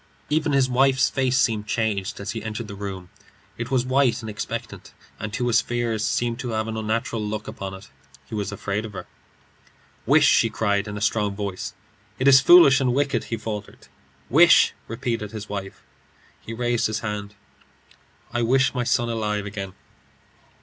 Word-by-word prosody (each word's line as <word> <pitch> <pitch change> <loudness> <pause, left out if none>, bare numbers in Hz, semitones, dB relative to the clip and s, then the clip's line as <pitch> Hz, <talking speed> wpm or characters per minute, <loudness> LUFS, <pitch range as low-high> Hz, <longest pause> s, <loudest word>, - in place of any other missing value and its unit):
Even 155 0 +1
his 135 -2 +3
wife's 135 +1 +3
face 130 -1 +1
seemed 110 -5 +1
changed 105 -3 -1
as 100 - -4
he 115 - -5
entered 110 +1 -5
the 100 - -8
room. 95 -3 -7 0.4
It - - -5
was 130 -2 +1
white 130 -1 +2
and 110 - -5
expectant, 105 - -6 0.3
and 110 - -5
to 120 +2 -1
his 120 -2 +3
fears 120 -3 -2
seemed 120 +1 -1
to 125 -2 -4
have 110 0 -1
an 110 - -4
unnatural 110 0 -2
look 105 0 -4
upon 100 -3 -6
it. 95 +2 -12 0.4
He - - -13
was 105 -2 -2
afraid 100 +1 -3
of 110 -2 -8
her. - - -7 1.0
"Wish!" - - +5
she - - +4
cried, 100 -1 0
in 105 0 -5
a - - -6
strong 105 -1 0
voice. 100 -2 -5 0.4
"It 130 - 0
is 135 -1 +8
foolish 140 -4 +7
and 125 -2 +1
wicked," 140 -4 0
he 115 - -3
faltered. 105 -1 -7 0.4
"Wish!" 165 +6 +6
repeated 115 -2 -3
his 105 -1 -7
wife. 100 -1 -6 0.6
He - - -9
raised 120 0 0
his 110 0 -3
hand. 105 -1 -5 1.0
"I 120 - 0
wish 130 +3 +3
my 125 -2 -1
son 120 0 +1
alive 105 -3 -2
again." 100 -2 -6
110 Hz, 175 wpm, -23 LUFS, 105-125 Hz, 1.0 s, is